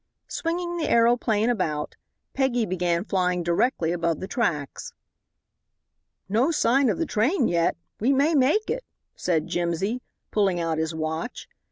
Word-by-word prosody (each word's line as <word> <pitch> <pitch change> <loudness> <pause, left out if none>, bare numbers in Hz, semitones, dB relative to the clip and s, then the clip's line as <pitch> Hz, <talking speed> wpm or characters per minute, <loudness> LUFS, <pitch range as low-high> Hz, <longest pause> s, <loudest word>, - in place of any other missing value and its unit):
Swinging 345 +1 -2
the 320 - -1
aeroplane 230 -1 +3
about, 155 -9 -2 0.4
Peggy 250 -4 +1
began 175 -2 0
flying 180 -3 0
directly 170 0 +1
above 170 -2 0
the 190 - -5
tracks. 170 - -2 1.3
"No 225 - +2
sign 275 -4 +3
of - - 0
the 330 - 0
train 255 - +1
yet 170 -1 +1 0.2
we 240 +6 +2
may 280 +4 +3
make 300 +10 +3
it," - - -2 0.3
said 160 -3 0
Jimsy, 175 +8 -1 0.3
pulling 195 -4 +2
out 165 -2 -1
his 160 0 -2
watch. 160 +7 -4
210 Hz, 140 wpm, -25 LUFS, 170-260 Hz, 1.3 s, aeroplane